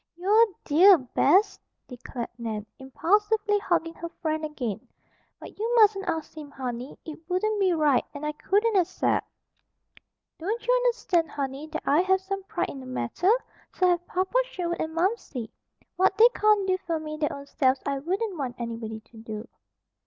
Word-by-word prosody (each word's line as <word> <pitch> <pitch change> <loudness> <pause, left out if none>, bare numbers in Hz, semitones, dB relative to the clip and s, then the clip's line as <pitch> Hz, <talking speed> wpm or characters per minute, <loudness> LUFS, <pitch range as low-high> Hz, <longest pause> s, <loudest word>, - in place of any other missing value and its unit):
"You're 400 +6 +4
a - - -19
dear, 360 +6 +7
Bess!" 300 - +2 0.3
declared 245 -1 -7
Nan, 220 -3 -4
impulsively 415 +10 +1
hugging 335 -4 0
her 335 0 -7
friend 315 -1 -2
again. 245 -9 -4 0.5
"But - - -12
you 460 +3 0
mustn't 410 -4 +4
ask 320 -1 -3
him, 300 -2 -8
honey. 255 -1 -6
It 315 0 -8
wouldn't 420 +4 0
be 380 -2 +3
right, 295 -5 +3
and 285 +1 -7
I 300 - 0
couldn't 410 +8 +1
accept. 365 -3 +1 1.1
"Don't 420 +8 -3
you - - +3
understand, 470 -10 +1
honey, 275 +1 -4
that 315 0 -5
I 290 +3 +4
have 380 +1 +2
some 390 +1 -4
pride - - -2
in 275 - -8
the 260 - -10
matter? 255 - -1 0.4
So 365 -1 +3
have 350 0 0
Papa 375 +3 -2
Sherwood 345 -7 -4
and 320 0 -4
Momsey. 335 - -2 0.5
What 380 +1 +3
they 465 +2 +8
can't 425 -2 +3
do 370 0 +1
for 330 -3 -3
me 305 0 -6
their 300 -1 0
own 280 0 -8
selves 260 -2 +1
I 275 -1 -1
wouldn't 375 +4 -2
want 255 -3 -3
anybody 230 -2 -5
to 220 +1 -19
do." 220 0 -7
330 Hz, 175 wpm, -26 LUFS, 270-390 Hz, 1.1 s, they